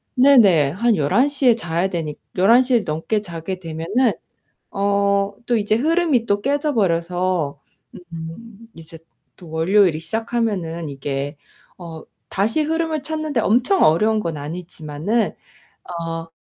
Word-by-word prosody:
네네 220 Hz, -, +5 dB
한 230 Hz, +5 st, +1 dB
11:00 260 Hz, -, +1 dB
에 235 Hz, -, +6 dB
자야 175 Hz, -3 st, -1 dB
되니 160 Hz, -4 st, -4 dB, 0.2 s
11:00 245 Hz, +7 st, +4 dB
에 -, -, +5 dB
넘게 180 Hz, +5 st, -2 dB
자게 175 Hz, 0 st, -6 dB
되면은 170 Hz, +9 st, 0 dB, 0.6 s
어 200 Hz, 0 st, +1 dB
또 240 Hz, -1 st, +1 dB
이제 215 Hz, 0 st, +1 dB
흐름이 305 Hz, -1 st, +1 dB
또 205 Hz, -2 st, +1 dB
깨져 290 Hz, +4 st, 0 dB
버려서 175 Hz, -, 0 dB, 0.5 s
음 205 Hz, +8 st, -9 dB
이제 165 Hz, 0 st, -12 dB, 0.4 s
또 175 Hz, -4 st, -14 dB
월요일이 165 Hz, +1 st, +2 dB
시작하면은 205 Hz, -6 st, -2 dB
이게 140 Hz, +1 st, -4 dB, 0.4 s
어 165 Hz, -3 st, -9 dB, 0.3 s
다시 220 Hz, +10 st, 0 dB
흐름을 320 Hz, -1 st, -1 dB
찾는데 310 Hz, -5 st, -2 dB
엄청 250 Hz, -, +2 dB
어려운 215 Hz, +7 st, +3 dB
건 165 Hz, -5 st, -4 dB
아니지만은 160 Hz, +6 st, -3 dB, 0.7 s
어 165 Hz, 0 st, -5 dB
200 Hz, 240 characters per minute, -20 LUFS, 165-235 Hz, 0.7 s, 에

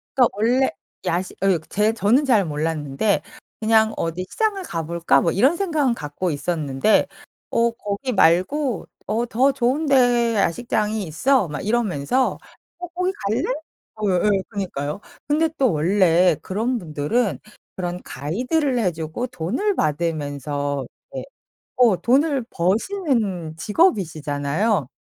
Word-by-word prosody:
그러니까 255 Hz, -2 st, +6 dB
원래 245 Hz, +5 st, +2 dB, 0.3 s
야시 180 Hz, +2 st, -1 dB
어 195 Hz, -3 st, +3 dB
제 210 Hz, +2 st, +2 dB
저는 225 Hz, +7 st, +2 dB
잘 225 Hz, -7 st, +3 dB
몰랐는데 155 Hz, +4 st, -1 dB, 0.4 s
그냥 220 Hz, 0 st, +3 dB
'어디 165 Hz, +2 st, -2 dB
시장을 425 Hz, -3 st, 0 dB
가볼까?' 170 Hz, -, +1 dB
뭐 165 Hz, -, +1 dB
이런 265 Hz, -, +3 dB
생각은 310 Hz, -10 st, +1 dB
갖고 150 Hz, 0 st, -3 dB
있었는데 145 Hz, +3 st, +1 dB, 0.4 s
어 235 Hz, 0 st, +2 dB
"거기 230 Hz, +3 st, -4 dB
말고 205 Hz, -, +2 dB, 0.2 s
어 230 Hz, +3 st, 0 dB
더 255 Hz, +4 st, +2 dB
좋은 265 Hz, +4 st, 0 dB
데 245 Hz, -4 st, +3 dB
야시장이 210 Hz, +2 st, 0 dB
있어." 205 Hz, -, +1 dB
막 150 Hz, -, -5 dB
이러면서 215 Hz, -, 0 dB, 0.4 s
"어 355 Hz, 0 st, -6 dB
거기 365 Hz, +2 st, -1 dB
갈래?" 215 Hz, +3 st, +1 dB, 0.6 s
예예. 195 Hz, +1 st, +2 dB
그러니까요. 185 Hz, -5 st, -4 dB, 0.3 s
근데 310 Hz, +2 st, +2 dB
또 260 Hz, -7 st, +3 dB
원래 175 Hz, +1 st, +3 dB
그런 230 Hz, +6 st, -1 dB
분들은 175 Hz, +6 st, -1 dB, 0.4 s
그런 180 Hz, -1 st, -4 dB
가이드를 250 Hz, -, -1 dB
해주고 175 Hz, +3 st, -2 dB
돈을 255 Hz, -, -1 dB
받으면서 145 Hz, -3 st, -2 dB, 0.3 s
이렇게 -, -, -6 dB, 0.5 s
어 240 Hz, -6 st, +5 dB
돈을 275 Hz, +1 st, +2 dB
버시는 200 Hz, -, -1 dB
직업이시잖아요. 160 Hz, -, +1 dB
205 Hz, 270 characters per minute, -22 LUFS, 165-250 Hz, 0.6 s, 그러니까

